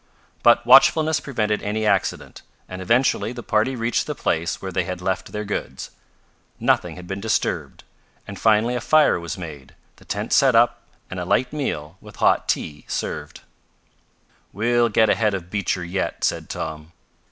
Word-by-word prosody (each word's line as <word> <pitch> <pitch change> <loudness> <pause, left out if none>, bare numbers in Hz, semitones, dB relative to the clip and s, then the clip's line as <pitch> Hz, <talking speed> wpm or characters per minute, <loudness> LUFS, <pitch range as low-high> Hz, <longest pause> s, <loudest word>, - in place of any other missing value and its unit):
But - - +5
watchfulness 160 -1 +6
prevented 105 -7 -2
any 110 +1 -2
accident, - - -1 0.3
and 95 0 -7
eventually 120 +3 +1
the 120 -1 -8
party 110 +5 +1
reached 115 0 -1
the - - -3
place 85 +1 -1
where 95 - -6
they 90 - 0
had 90 +1 -5
left 95 0 -3
their 105 0 -4
goods. 65 -10 -5 0.7
Nothing - - +1
had 90 - -10
been 95 +2 -5
disturbed, 110 -1 -2 0.4
and 100 - -8
finally 110 +2 +3
a 125 - -2
fire 155 - +4
was 85 +2 -6
made, 75 -7 -9 0.2
the - - -19
tents - - -1
set 135 -3 +4
up 120 +1 +3 0.3
and - - -4
a - - -2
light 130 +2 0
meal, 85 - -4
with - - -13
hot - - +2
tea 75 -1 -2
served. - - -5 1.1
"We'll 120 +3 +1
get 110 +1 +3
ahead 105 -3 +1
of 90 -1 -7
Beecher 95 -3 -1
yet," 90 +3 -3
said - - -1
Tom. 80 +1 -6
105 Hz, 165 wpm, -22 LUFS, 90-120 Hz, 1.1 s, watchfulness